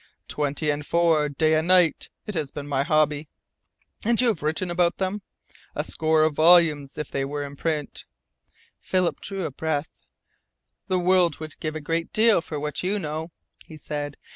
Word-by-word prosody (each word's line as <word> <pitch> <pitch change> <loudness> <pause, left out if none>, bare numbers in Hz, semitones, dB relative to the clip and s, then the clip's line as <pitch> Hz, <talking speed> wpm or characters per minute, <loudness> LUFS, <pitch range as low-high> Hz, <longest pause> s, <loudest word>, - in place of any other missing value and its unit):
"Twenty 150 +1 -1
and 145 0 -3
four, 160 -2 +2
day 155 +3 +1
and 160 +1 +1
night; 180 -3 +3 0.2
it 210 - -5
has 155 -6 -2
been 145 +1 -7
my 140 -2 0
hobby." 150 0 +1 0.8
"And 230 +1 +2
you 250 -1 +4
have 215 - -2
written 160 +4 -1
about 175 0 +1
them?" 195 +2 -2 0.5
"A - - -1
score 155 0 +1
of 155 -1 +2
volumes, 155 -3 +4
if 150 -2 -5
they 135 - -1
were 145 +1 -3
in 140 0 -8
print." 150 -1 -3 0.7
Philip 185 -2 0
drew 195 -3 -4
a - - -2
deep - - -31
breath. 160 -1 -1 1.0
"The 185 -2 +1
world 180 -3 +3
would 155 -1 -9
give 155 0 -4
a 155 - -4
great 165 +3 -2
deal 220 -4 +4
for 155 -2 -6
what 150 0 -3
you 195 +3 0
know," 160 -2 -4 0.4
he 155 - -11
said. 145 -1 -5
155 Hz, 185 wpm, -24 LUFS, 150-175 Hz, 1.0 s, you